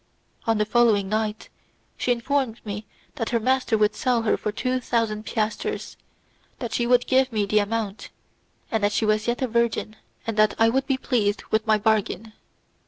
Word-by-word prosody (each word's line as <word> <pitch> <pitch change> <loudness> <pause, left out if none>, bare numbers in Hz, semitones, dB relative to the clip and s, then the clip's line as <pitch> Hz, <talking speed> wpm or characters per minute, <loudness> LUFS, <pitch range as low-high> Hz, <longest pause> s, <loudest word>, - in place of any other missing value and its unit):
On 225 -1 +3
the 210 - +2
following 215 -3 +3
night, 215 0 -2 0.5
she 250 - 0
informed 245 -1 0
me 210 +1 -5 0.3
that 225 - -2
her 235 - +1
master 255 -1 +1
would 210 0 +2
sell 245 -3 +1
her 220 - +2
for 210 - -3
two 255 +4 -1
thousand 225 -3 -1
piasters, 215 -1 -2 0.6
that 235 -3 -5
she 240 0 0
would 245 0 +4
give 260 0 +3
me 210 -2 0
the 210 +1 +3
amount, 210 -1 -3 0.6
that 205 -2 +1
she 220 - +1
was 215 +1 +1
yet 240 +3 0
a - - +1
virgin, 235 -2 0 0.3
and 225 -2 -3
that 215 0 +4
I 225 0 +5
would 265 +3 0
be 270 -2 +1
pleased 220 -6 0
with 220 +1 +1
my 215 -1 +5
bargain. 215 0 0
225 Hz, 180 wpm, -24 LUFS, 215-240 Hz, 0.6 s, I